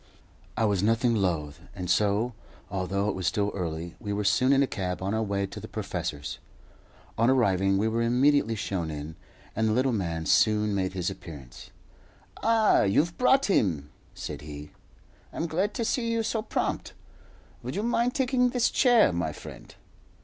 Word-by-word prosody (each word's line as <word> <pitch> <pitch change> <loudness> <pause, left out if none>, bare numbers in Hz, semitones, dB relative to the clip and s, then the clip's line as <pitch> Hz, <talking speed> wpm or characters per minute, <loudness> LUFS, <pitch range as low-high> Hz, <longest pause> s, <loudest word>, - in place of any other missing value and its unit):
I 115 - +2
was 100 -3 +1
nothing 115 +3 +2
loth, 85 -8 -1 0.2
and 90 -2 -5
so, 105 +5 +1 0.4
although 100 +1 -1
it 105 - 0
was 95 -2 -3
still 105 0 0
early, 85 -2 -4
we 105 -3 -5
were 105 +1 -1
soon 125 +6 +3
in 140 0 +5
a - - +3
cab 90 -7 -3
on 95 +2 -2
our 110 - 0
way 100 -2 -1
to 95 - -8
the - - -8
professor's. 75 -1 -4 0.8
On 115 +2 +4
arriving, 95 -7 +3
we 105 +3 +1
were 115 +1 0
immediately 125 0 +3
shown 95 -5 -3
in, 75 +1 -6 0.4
and 110 +1 +1
the 110 - +2
little 130 +3 +2
man 85 -6 -2
soon 105 +2 +3
made 95 -1 -1
his 90 -2 -2
appearance. 70 -7 -11 0.7
"Ah! 225 -1 +4
you've 150 - +2
brought 265 +2 +4
him?" 80 - +1 0.2
said - - -6
he. 75 0 -9 0.6
"I'm 165 - -3
glad 185 +6 -1
to 230 - -1
see 230 0 0
you 230 0 0
so 220 0 -1
prompt. - - -2 0.7
Would - - -5
you 205 - -1
mind 240 +1 +1
taking 250 -2 +2
this 245 -1 +1
chair, 245 - +4
my 85 - -1
friend?" - - -11
105 Hz, 175 wpm, -27 LUFS, 90-140 Hz, 0.8 s, in